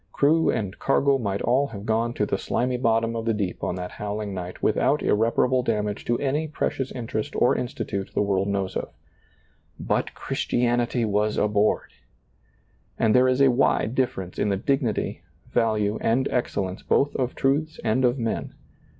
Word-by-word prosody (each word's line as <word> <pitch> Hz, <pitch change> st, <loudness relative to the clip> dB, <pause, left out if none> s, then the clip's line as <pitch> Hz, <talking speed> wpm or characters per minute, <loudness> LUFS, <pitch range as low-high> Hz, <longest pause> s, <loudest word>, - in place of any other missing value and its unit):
Crew 160 Hz, +3 st, +3 dB
and 100 Hz, -3 st, -2 dB
cargo 135 Hz, 0 st, +2 dB
might 100 Hz, -4 st, -2 dB
all 130 Hz, +4 st, +2 dB
have 105 Hz, -4 st, -8 dB
gone 115 Hz, +2 st, 0 dB
to 105 Hz, -, +1 dB
the 100 Hz, -, -2 dB
slimy 125 Hz, +1 st, -1 dB
bottom 115 Hz, -1 st, +1 dB
of 115 Hz, 0 st, -3 dB
the 115 Hz, -1 st, +1 dB
deep 100 Hz, -4 st, -3 dB
on -, -, -1 dB
that 90 Hz, -1 st, -5 dB
howling 105 Hz, 0 st, -4 dB
night 90 Hz, -1 st, -7 dB
without -, -, +2 dB
irreparable 115 Hz, +4 st, +2 dB
damage 105 Hz, -3 st, -2 dB
to 120 Hz, -, +1 dB
any 145 Hz, +4 st, -1 dB
precious 135 Hz, -3 st, -2 dB
interest 110 Hz, -3 st, -4 dB
or 125 Hz, -, +3 dB
institute 100 Hz, -5 st, -3 dB
the -, -, +2 dB
world 100 Hz, -1 st, 0 dB
knows 100 Hz, -2 st, -2 dB
of. -, -, -3 dB, 0.9 s
But -, -, -1 dB
Christianity 120 Hz, 0 st, 0 dB
was 105 Hz, 0 st, 0 dB
aboard! 105 Hz, 0 st, +1 dB, 1.1 s
And 110 Hz, -1 st, +3 dB
there 125 Hz, 0 st, +5 dB
is 130 Hz, +1 st, +2 dB
a 135 Hz, -, +6 dB
wide 120 Hz, -2 st, +2 dB
difference 95 Hz, -9 st, -2 dB
in 105 Hz, -, +1 dB
the 100 Hz, -, +1 dB
dignity, 125 Hz, 0 st, -1 dB, 0.3 s
value 110 Hz, -2 st, +1 dB
and 130 Hz, +4 st, +2 dB
excellence 95 Hz, -6 st, -2 dB
both 145 Hz, +1 st, +1 dB
of 130 Hz, -2 st, -1 dB
truths 150 Hz, +4 st, 0 dB
and 115 Hz, +3 st, +1 dB
of 125 Hz, +1 st, +3 dB
men. 115 Hz, -3 st, -3 dB
115 Hz, 165 wpm, -25 LUFS, 105-130 Hz, 1.1 s, a